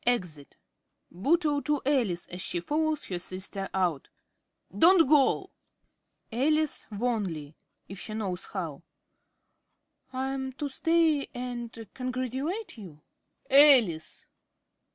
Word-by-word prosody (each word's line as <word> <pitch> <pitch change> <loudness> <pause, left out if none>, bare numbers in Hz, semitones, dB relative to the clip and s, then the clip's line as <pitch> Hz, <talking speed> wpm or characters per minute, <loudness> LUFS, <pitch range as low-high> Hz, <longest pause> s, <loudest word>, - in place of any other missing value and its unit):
(Exit.) 180 -12 -2 0.5
~Bootle~ 290 - +1
(to 300 -1 0
Alice, 235 -12 +1
as 180 +1 -6
she 175 - -2
follows 305 - -1
her 180 -2 -3
sister 190 +2 -5
out). 175 -7 -1 0.7
Don't 335 - +6
go! 285 -2 +3 0.8
~Alice~ 305 +6 0
(wanly, 200 -10 -2 0.3
if 195 0 -8
she 215 - -5
knows 190 -5 -3
how). 165 -8 -5 1.3
Am 265 +1 -3
I 260 - -7
to 290 - -3
stay 325 0 +2
and 240 -2 -6
congratulate 255 - -4
you? 160 -7 -12 0.4
~Bootle.~ 285 0 +9
Alice! 160 -5 -6
245 Hz, 110 wpm, -28 LUFS, 185-290 Hz, 1.3 s, ~Bootle.~